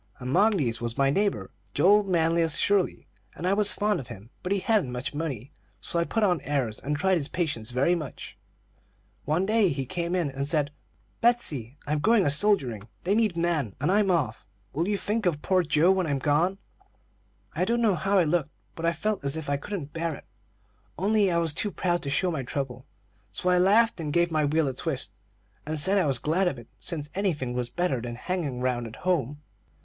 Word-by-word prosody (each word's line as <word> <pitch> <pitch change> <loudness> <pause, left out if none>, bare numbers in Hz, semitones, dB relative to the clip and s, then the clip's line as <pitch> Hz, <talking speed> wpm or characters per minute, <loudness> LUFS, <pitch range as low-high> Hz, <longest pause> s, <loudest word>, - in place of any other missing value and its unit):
"Among 190 - +2
these, 120 -7 0
was 120 +1 -3
my 135 -1 +3
neighbor 195 - 0 0.2
Joel 200 +8 +5
Manlius 165 -4 +2
Shirley, 200 -3 +1 0.3
and 170 - -6
I 185 - +3
was 205 0 +4
fond 210 0 +1
of 130 - -8
him; 115 +1 -11
but 180 - -4
he 200 - +3
hadn't 200 - +1
much 125 +3 -4
money, 145 -4 -4 0.3
so 170 - -2
I 170 - +1
put 225 +4 -1
on 180 -7 +2
airs, 135 -6 -2
and 150 +1 -2
tried 190 +4 +2
his 140 - -2
patience 150 -12 -2
very 130 +8 +2
much. 155 -6 -6 0.9
One 160 +6 +1
day 215 -2 +3
he 135 -3 -2
came 170 +4 -2
in 170 -6 0
and 135 +1 -3
said: 150 -1 +1 0.5
'Betsey, 150 - +1
I'm 150 +1 0
going 220 +3 +3
a 145 - +3
soldiering; 140 - +1 0.2
they 190 - +1
need 215 -5 +1
men, 165 - 0
and 145 +7 +1
I'm 205 0 +3
off. 145 -11 0 0.3
Will 165 +6 -1
you 205 0 +1
think 210 0 -1
of 150 -4 -1
poor 185 -1 +3
Joe 165 +2 +3
when 190 -3 +1
I'm 140 -2 0
gone?' 155 +7 +1 1.0
"I - - 0
don't 235 +1 +1
know 225 -4 +3
how 195 +4 +1
I 185 - +5
looked, 160 -1 0 0.2
but 165 0 -3
I 170 - +2
felt 210 +2 -2
as 140 +2 -1
if 150 -3 -4
I 140 - +1
couldn't 150 -2 -6
bear 165 -1 -2
it. - - -13 0.7
Only 200 +1 +2
I 170 - +1
was 165 -3 +1
too 205 - 0
proud 175 -3 -1
to 140 - -4
show 175 +6 +1
my 155 -5 -2
trouble; 130 0 -5 0.4
so 180 - -1
I 180 0 +4
laughed, 210 +3 +4
and 155 -3 -3
gave 170 +2 +2
my 155 -1 +2
wheel 155 +1 +1
a 135 - -2
twist, 135 0 -4 0.5
and 155 +1 -3
said 190 +7 +3
I 180 - +2
was 135 -3 +1
glad 165 +9 +1
of 145 - -1
it, 120 - -12
since 150 -3 -3
anything 160 -11 -1
was 125 -1 -2
better 170 -5 -1
than 120 0 -5
hanging 145 -3 -3
round 125 -2 -1
at 110 - -10
home. 150 -5 0
160 Hz, 215 wpm, -27 LUFS, 140-190 Hz, 1.0 s, Joel